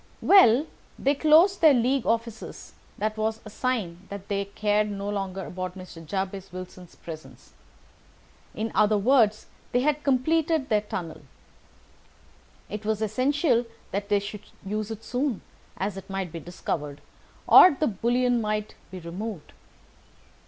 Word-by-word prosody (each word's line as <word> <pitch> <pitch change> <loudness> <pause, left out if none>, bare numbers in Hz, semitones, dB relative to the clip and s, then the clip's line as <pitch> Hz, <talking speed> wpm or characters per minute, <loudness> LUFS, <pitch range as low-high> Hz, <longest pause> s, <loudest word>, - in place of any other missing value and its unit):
"Well, 285 - +6
when - - -23 0.3
they 275 - +2
closed 320 +7 +5
their 310 -4 +7
League 255 +1 +1
offices 230 -1 -3 0.2
that 215 +1 -2
was 220 +1 -1
a 215 - -9
sign 200 -8 -3
that 200 0 -8
they 200 -1 -1
cared 210 +1 0
no 200 0 -5
longer 195 -2 -3
about 185 0 -6
Mr. 180 -3 -10
Jabez 195 +3 -4
Wilson's 185 -1 -10
presence—in 170 +6 -11
other 210 0 +3
words, 215 -1 +3
that - - -31
they 245 - +3
had 300 +2 0
completed 305 +2 +1
their 210 -1 +3
tunnel. 175 -6 -6 1.5
But 210 - -5
it - - -21
was 220 0 -1
essential 255 - +1 0.2
that 200 +1 -3
they 205 - +4
should 205 +1 -5 0.2
use 210 +2 -3
it 225 0 -7
soon, 250 -3 -2 0.4
as 195 0 -3
it 190 +1 -10
might 195 -3 -3
be 165 - -6
discovered, 150 -3 -5 0.5
or - - +9
the 310 - +2
bullion 240 +2 +1
might 215 0 -2 0.2
be 185 - -8
removed. 180 +2 -7
210 Hz, 145 wpm, -26 LUFS, 195-245 Hz, 1.5 s, or